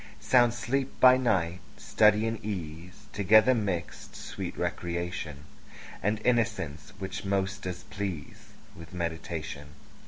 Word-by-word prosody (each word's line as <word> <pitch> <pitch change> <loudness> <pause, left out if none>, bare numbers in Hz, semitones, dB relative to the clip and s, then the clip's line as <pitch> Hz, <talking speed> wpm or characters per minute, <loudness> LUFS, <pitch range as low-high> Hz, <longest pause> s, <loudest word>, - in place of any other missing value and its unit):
Sound 120 -2 +4
sleep 130 +4 -2
by 130 0 +8
night; 90 -9 +1 0.2
study 105 0 +3
and 115 -1 -3
ease 90 -3 -6
Together 110 +5 +5
mixed; 100 -8 -3
sweet - - -6
recreation, 85 -4 -3 0.6
And 105 +2 0
innocence, 110 -12 0
which 95 0 -5
most 100 0 -1
does 90 -1 -5
please 95 -7 -6 0.3
With 85 +2 -11
meditation. 80 -3 -5
95 Hz, 115 wpm, -29 LUFS, 85-110 Hz, 0.6 s, by